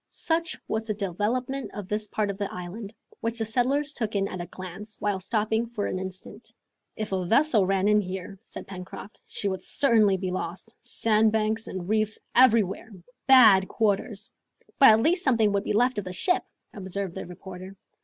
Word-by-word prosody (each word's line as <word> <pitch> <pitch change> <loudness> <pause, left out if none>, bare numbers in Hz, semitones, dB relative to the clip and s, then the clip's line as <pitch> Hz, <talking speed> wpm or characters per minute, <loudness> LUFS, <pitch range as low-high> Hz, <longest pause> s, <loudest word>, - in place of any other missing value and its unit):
Such 335 +2 -1
was 220 +1 -2
the 215 - -1
development 220 +8 -2
of 205 -3 -6
this 210 +1 -2
part 205 0 -1
of 195 - -10
the 200 - -2
island, 190 +4 -7 0.3
which 230 +1 -3
the 225 - 0
settlers 270 +6 0
took 220 -5 -3
in 195 0 +1
at 185 - -5
a 175 - -6
glance, 185 +5 -9
while 205 -2 -1
stopping 220 +3 0
for 225 -3 -3
an 185 - -2
instant. 185 0 -8 0.4
"If 215 -1 -4
a 190 -1 0
vessel 225 - +3
ran 195 0 +1
in 210 0 +4
here," 190 0 -6
said - - -10
Pencroft, 185 +2 -9
"she 205 - -3
would 190 -2 -2
certainly 215 -5 +3
be 185 -1 -3
lost. 185 +5 -5
Sandbanks 220 0 +1
and 180 -2 -6
reefs 215 0 +1 0.2
everywhere! 230 -4 +3 0.4
Bad 220 -8 +7
quarters!" 210 -1 -1 0.5
"But 270 - +9
at 220 +1 +5
least 355 +3 +3
something 225 -6 +3
would 200 0 0
be - - -1
left 245 +1 +2
of 200 - -6
the 185 - -5
ship," 360 - +1 0.3
observed 195 -2 -4
the - - -7
reporter. 185 +1 -10
210 Hz, 185 wpm, -26 LUFS, 190-225 Hz, 0.5 s, But